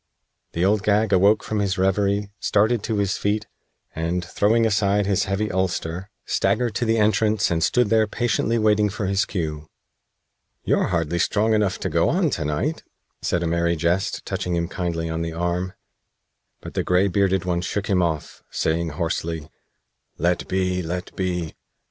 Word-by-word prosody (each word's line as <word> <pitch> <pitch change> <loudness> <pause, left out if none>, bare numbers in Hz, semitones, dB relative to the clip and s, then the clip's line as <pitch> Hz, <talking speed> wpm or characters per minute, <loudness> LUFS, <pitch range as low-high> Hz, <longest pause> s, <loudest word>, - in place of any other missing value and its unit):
The 85 +2 +1
Old 105 +1 +3
Gag 105 0 +2
awoke 100 +3 +4
from 110 - -2
his 100 -1 0
reverie, 100 +2 +1
started 110 +2 +2
to 110 0 -2
his 100 -2 0
feet, 105 +1 -1 0.5
and, 85 +2 -2
throwing 110 +5 +2
aside 105 -1 +2
his 100 -1 +1
heavy 100 +2 -1
ulster, 95 0 -2 0.2
staggered 120 -3 +1
to 120 - -1
the 115 0 +2
entrance 105 -1 +2
and 80 -1 +1
stood 105 - +2
there 110 -1 +4
patiently 115 +1 0
waiting 105 -1 +3
for 105 +1 -4
his 100 0 +1
cue. 75 -5 -4 1.0
"You're - - +2
hardly 85 -1 -1
strong 110 +5 +2
enough 105 -3 +1
to - - -1
go - - +2
on - - +1
to - - -2
night," 75 0 -1 0.4
said 85 0 0
a - - 0
Merry 85 +1 +1
Jest, 85 +4 -1
touching 90 -1 -2
him 85 0 0
kindly 85 -3 -3
on 80 0 -3
the 85 0 -3
arm; 90 +2 -2 0.9
but - - -9
the - - 0
gray 90 +2 +3
bearded 95 -1 +1
one 85 -1 0
shook 100 +3 -2
him 95 -4 +2
off, 80 -4 -2
saying 80 +1 0
hoarsely: 80 -2 -3 0.7
"Let 85 +2 0
be! 90 -1 0
Let 90 +2 -5
be! 90 -4 -2
95 Hz, 170 wpm, -23 LUFS, 85-105 Hz, 1.0 s, awoke